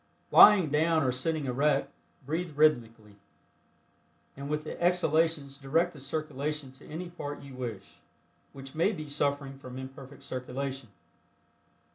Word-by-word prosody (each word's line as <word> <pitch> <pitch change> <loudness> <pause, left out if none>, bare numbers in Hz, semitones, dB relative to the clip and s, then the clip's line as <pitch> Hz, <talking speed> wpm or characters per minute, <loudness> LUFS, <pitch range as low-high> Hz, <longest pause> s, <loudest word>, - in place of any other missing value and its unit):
Lying 190 -8 +8
down 160 +1 +3
or 130 - +2
sitting 150 +4 -1
erect, 140 +4 +1 0.3
breathe 160 +1 -3
rhythmically, 115 -9 +1 1.2
and 140 +1 -7
with 150 0 -1
the 155 - -7
exhalations 160 -5 +1
direct 165 +6 +1
the 150 - -12
circulation 150 0 -3
to 135 +2 -16
any 175 +3 -6
part 145 -4 -6
you 140 -1 -11
wish, 115 -6 -7 0.5
which 135 -1 -10
may 170 +7 +2
be 155 -5 -6
suffering 140 -1 -1
from 130 -1 -9
imperfect 135 +1 -10
circulation. 130 0 -5
145 Hz, 130 wpm, -29 LUFS, 135-155 Hz, 1.2 s, Lying